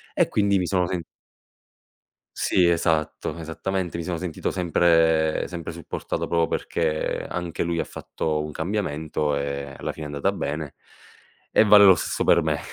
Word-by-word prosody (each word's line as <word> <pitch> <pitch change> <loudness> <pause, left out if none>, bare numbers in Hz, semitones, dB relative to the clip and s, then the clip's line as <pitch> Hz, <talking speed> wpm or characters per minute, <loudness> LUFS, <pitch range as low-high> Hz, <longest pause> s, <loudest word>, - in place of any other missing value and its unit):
e - - +3
quindi 100 -1 +2
mi 90 - 0
sono 90 -1 +1
sen 90 -1 -3 1.4
Sì, 90 -2 +3
esatto, 80 -2 0
esattamente. 85 +2 -3
Mi 85 - -3
sono 85 0 -3
sentito 90 -3 -3
sempre 80 -3 +2
sempre 85 -2 -6
supportato 85 -1 -4
proprio 85 -1 +2
perché 80 -2 -2
anche 85 -2 -3
lui 85 0 -1
ha - - +1
fatto 75 -1 -3
un 75 - -6
cambiamento 80 -4 -2
e 70 0 -4
alla - - -4
fine 80 - -8
è - - -4
andata 70 - +1
bene 75 -1 -4 0.8
e - - +5
vale 105 -1 +8
lo 95 -2 +8
stesso - - -2
per - - +4
me. - - 0
85 Hz, 160 wpm, -24 LUFS, 75-90 Hz, 1.4 s, vale